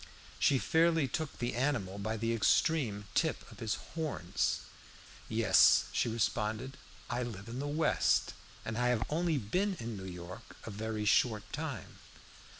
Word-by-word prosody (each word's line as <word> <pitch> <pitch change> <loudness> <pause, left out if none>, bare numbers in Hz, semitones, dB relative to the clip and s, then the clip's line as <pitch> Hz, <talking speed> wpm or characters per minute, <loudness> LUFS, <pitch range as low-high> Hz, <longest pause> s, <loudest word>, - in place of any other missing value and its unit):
She 140 - +4
fairly 160 +1 +3
took 155 +4 -3
the 120 0 -2
animal 115 -7 -1
by 110 +2 -2
the 115 +1 0
extreme 115 -2 +2
tip - - 0
of - - -13
his 110 -2 -1 0.2
horns. 155 - -1 0.7
"Yes," 110 -5 +5
she - - +1
responded, 110 +3 -1 0.3
"I 120 +1 -2
live 110 -4 -6
in 120 +2 -5
the 145 - -2
West, 155 +2 +2 0.3
and 110 +1 -3
I 125 - +2
have 120 -3 +2
only 165 0 +1
been 180 - 0
in 115 -1 -4
New 95 -1 -6
York 90 +1 -10
a 115 - -6
very 110 +1 -3
short 105 0 +3
time. - - -5
115 Hz, 150 wpm, -33 LUFS, 105-140 Hz, 0.7 s, Yes